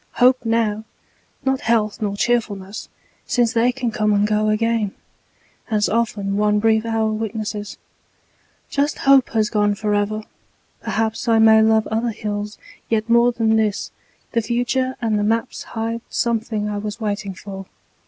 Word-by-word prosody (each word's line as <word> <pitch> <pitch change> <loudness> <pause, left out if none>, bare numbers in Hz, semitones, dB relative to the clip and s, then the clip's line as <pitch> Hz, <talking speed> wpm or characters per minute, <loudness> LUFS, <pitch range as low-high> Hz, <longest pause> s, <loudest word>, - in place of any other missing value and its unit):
Hope 255 +1 +4
now, 225 -2 0 0.6
not 265 0 +1
health 220 -2 +1
nor 200 -1 -2
cheerfulness, 205 -4 -1 0.4
Since 240 -1 +2
they 235 +1 +3
can 250 -2 -3
come 215 -1 +1
and 205 0 +3
go 215 0 +1
again, 220 -1 0 0.7
As 210 -2 +2
often 205 -3 -1
one 210 0 +2
brief 220 +1 +2
hour 220 -1 +1
witnesses, 215 -1 -4 0.9
Just 285 +1 0
hope 275 -2 +6
has 215 -2 +1
gone 205 -1 +2
forever. 210 +1 -1 0.6
Perhaps 225 +3 -2
I 225 -1 +4
may 220 0 +6
love 220 0 +3
other 225 +2 0
hills 210 -1 -4 0.3
yet 225 0 0
more 235 +1 +5
Than 225 -2 +2
this: 215 -2 -1 0.4
the 230 - +1
future 245 +3 -1
and 215 -2 +1
the - - 0
maps 230 +4 -1 0.2
Hide 230 +1 -2
something 225 -2 -1
I 205 -1 -3
was 210 +2 -5
waiting 205 -3 -3
for. 195 +1 -8
220 Hz, 150 wpm, -21 LUFS, 210-230 Hz, 0.9 s, hope